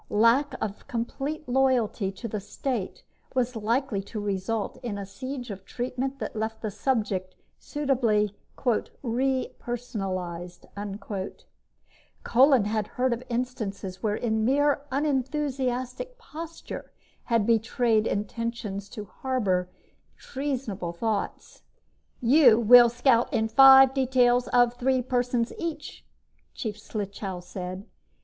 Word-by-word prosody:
Lack 230 +7 +3
of 205 -1 -5
complete 275 +6 -4
loyalty 245 -6 +2
to 195 +4 -7
the 215 -1 -3
state 210 +2 -4 0.3
was 250 -1 0
likely 225 0 0
to 210 +2 -7
result 205 +1 -2
in 235 -5 -4
a 200 - -5
siege 245 +5 -6
of 195 -1 -8
treatment 255 +5 -3
that 220 -4 -5
left 220 +1 -3
the 215 - -2
subject 205 -4 -1 0.2
suitably 235 -8 0 0.7
"re 260 +2 0
personalized." 185 -8 -5 1.6
Kolin 260 -2 +5
had 210 0 -1
heard 255 0 0
of 235 - -4
instances 220 -6 -3
wherein 220 0 0
mere 285 +4 +3
unenthusiastic 270 - -1
posture 330 -7 -8 0.3
had 230 -4 +2
betrayed 225 0 +2
intentions 210 -1 -3
to 210 -2 -7
harbor 195 -5 -1 0.5
treasonable 250 -11 -4
thoughts. 210 +3 -3 0.6
"You 245 -2 +6
will 240 +1 +8
scout 245 +1 +2
in 225 -4 +1
five 270 +2 +8
details 250 -2 +3
of 245 -1 +4
three 255 +1 +1
persons 245 -1 0
each," 335 -2 -5 0.5
Chief 215 -2 -4
Slichow 200 -3 -5
said. 185 +2 -6
235 Hz, 110 wpm, -27 LUFS, 210-260 Hz, 1.6 s, will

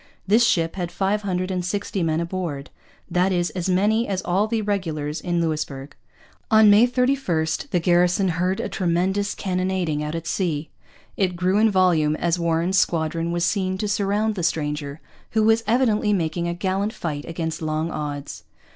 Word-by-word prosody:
This 220 +5 +4
ship 165 -5 +1
had 175 -2 -3
five 200 +2 0
hundred 185 -2 -2
and 180 -1 -2
sixty 195 +1 -2
men 160 -1 +1
aboard, 170 -5 -4 0.4
that 180 +2 +1
is, 175 -1 0
as 180 0 -3
many 210 +5 +2
as 190 -2 -2
all 190 +4 +1
the 220 -1 -1
regulars 160 -7 -2
in 175 -1 -1
Louisbourg. 150 -4 -3 0.5
On 220 -1 +7
May 215 +4 +6
31 250 -10 +1 0.2
the 180 - +1
garrison 180 +2 +2
heard 180 +3 0
a - - -2
tremendous 190 +3 0
cannonading 185 -5 -1
out 150 +2 -4
at 165 0 -5
sea. 160 -2 -2 0.5
It 185 -3 +1
grew 185 +3 +1
in 220 +1 +5
volume 175 -6 +3
as 170 +2 0
Warren's 170 +3 +1
squadron 165 0 0
was 175 0 0
seen 190 -2 0
to 210 - -2
surround 205 +1 0
the 190 - -4
stranger, 150 -3 -2 0.3
who 220 -1 +3
was 225 +1 +3
evidently 220 -3 +2
making 170 -2 -1
a 170 - -2
gallant 195 +4 -1
fight 150 -3 -4
against 165 -1 -4
long 155 +1 -2
odds. 145 -8 -5
180 Hz, 175 wpm, -23 LUFS, 165-200 Hz, 0.5 s, On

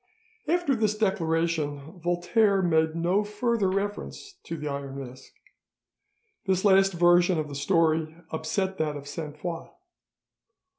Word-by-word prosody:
After 345 -5 +2
this 215 -2 0
declaration 165 -5 -1
Voltaire 190 +4 +2
made 160 -2 +2
no 175 +5 +1
further 210 -1 0
reference 205 - -4
to 165 - -5
the 150 0 -5
Iron 140 -1 -5
Mask. 130 0 -10 1.2
This 190 +1 +1
last 195 -1 +5
version 175 +1 +4
of 155 -1 -2
the - - -7
story 160 +2 +1 0.2
upset 190 +4 -2
that 150 -2 -1
of 140 0 -10
Sainte 150 0 -6
Foix. 165 +1 -5
175 Hz, 130 wpm, -27 LUFS, 155-195 Hz, 1.2 s, last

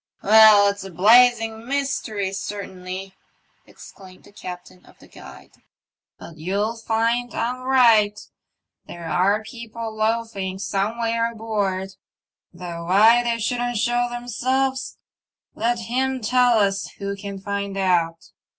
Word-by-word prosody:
''Well, 210 -1 +7
it's 200 -1 -9
a 195 - -8
blazing 225 +4 +4
mystery, 240 -8 -2
certainly," 190 -1 -6 0.5
exclaimed 185 -2 -15
the - - -18
captain 180 -2 -10
of - - -21
the - - -18
Guide. - - -14 0.4
" - - -72
But 165 - -12
you'll 200 +7 -2
find 230 +2 -1
I'm 245 +2 -2
right 230 -6 +4 0.4
— - - -60
there 170 -1 -8
are 195 +6 +1
people 230 0 -8
loafing 215 -4 -2
somewhere 230 +4 -1
aboard; 200 -4 -3 0.5
though 170 -1 -8
why 220 +7 +5
they 235 -1 -1
shouldn't 245 +1 -2
show 240 +2 0
themselves 255 +2 -2 0.6
let 240 +2 -1
him 255 +3 -2
tell 245 +1 +3
us 200 -2 0
who 200 0 -4
can 200 0 -7
find 200 0 -4
out. 170 -3 0
215 Hz, 125 wpm, -22 LUFS, 195-235 Hz, 0.6 s, Well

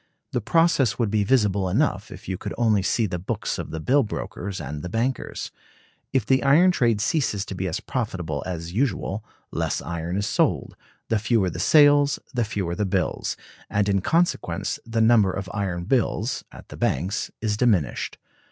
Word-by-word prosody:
The - - -1
process 165 - +3
would 115 -4 0
be 105 -1 +2
visible 100 -5 +2
enough - - 0
if - - -11
you 95 - -2
could - - -6
only 110 -4 +3
see 110 +4 +1
the 90 -3 -3
books 90 - -3
of - - -5
the 80 - -4
bill 135 - +3
brokers 100 -4 -5
and 75 0 -5
the 90 - -5
bankers. 120 +5 -2 0.6
If 130 -6 +1
the 130 +3 +3
iron 160 +7 +5
trade 115 -10 +2
ceases 105 -5 0
to - - -6
be 95 0 -3
as 85 - -2
profitable 90 - -3
as 85 -1 -5
usual, 110 -3 -1 0.3
less - - -1
iron 85 +2 -4
is 100 - 0
sold; - - 0 0.3
the 110 - +2
fewer 105 -3 +1
the - - -6
sales 145 -2 +5 0.2
the 120 -2 +1
fewer 100 -5 -2
the 95 - -1
bills; 95 - -1 0.3
and 105 0 +1
in 100 -1 +2
consequence 170 - 0
the 115 0 0
number 110 -4 +5
of 95 +1 -5
iron 95 -4 -2
bills 120 +2 0
[at - - -13
the - - -9
banks] 95 +4 -1
is 105 -1 0
diminished. 105 - +1
105 Hz, 180 wpm, -24 LUFS, 95-125 Hz, 0.6 s, iron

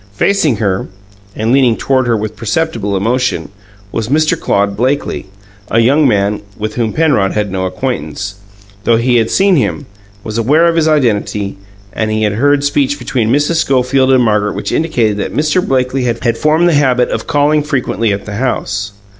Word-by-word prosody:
Facing 160 - +1
her, 100 -3 -1 0.5
and 110 +2 -1
leaning 130 -4 +3
toward 130 -2 +1
her 115 -1 +2
with 110 +1 -4
perceptible 110 -2 -2
emotion, 115 -4 -1 0.4
was 115 0 -3
Mr. 155 +2 +2
Claude 100 0 0
Blakely 130 -1 -1 0.4
a - - 0
young 135 +6 +4
man 105 -2 +1 0.2
with 110 0 -4
whom 115 -3 -1
Penrod 145 -12 +1
had 105 -2 -1
no 95 0 -2
acquaintance, 100 - -4 0.5
though 115 +1 +3
he 120 +1 +2
had 115 -1 +1
seen 195 -2 +3
him, 145 +2 -1 0.4
was 110 +1 -4
aware 150 +9 +3
of 170 -1 +2
his 160 -1 +2
identity, 105 -8 0 0.4
and 110 -1 -2
had 110 -1 0
heard 140 +5 +2
speech 280 - +1
between 115 - -1
Mrs. 145 +5 +1
Schofield 130 -2 +2
and 130 -2 +4
Margaret 105 -2 +1
which 100 - -4
indicated 120 -10 0
that 100 - -4
Mr. 155 +4 +1
Blakely 130 0 0
had 120 -1 0
formed 155 +6 +2
the 170 - +3
habit 130 -4 +2
of - - -4
calling 150 +1 +2
frequently 130 -6 -1
at 100 0 -3
the 105 -1 -6
house. 105 -5 -2
120 Hz, 175 wpm, -14 LUFS, 105-145 Hz, 0.5 s, young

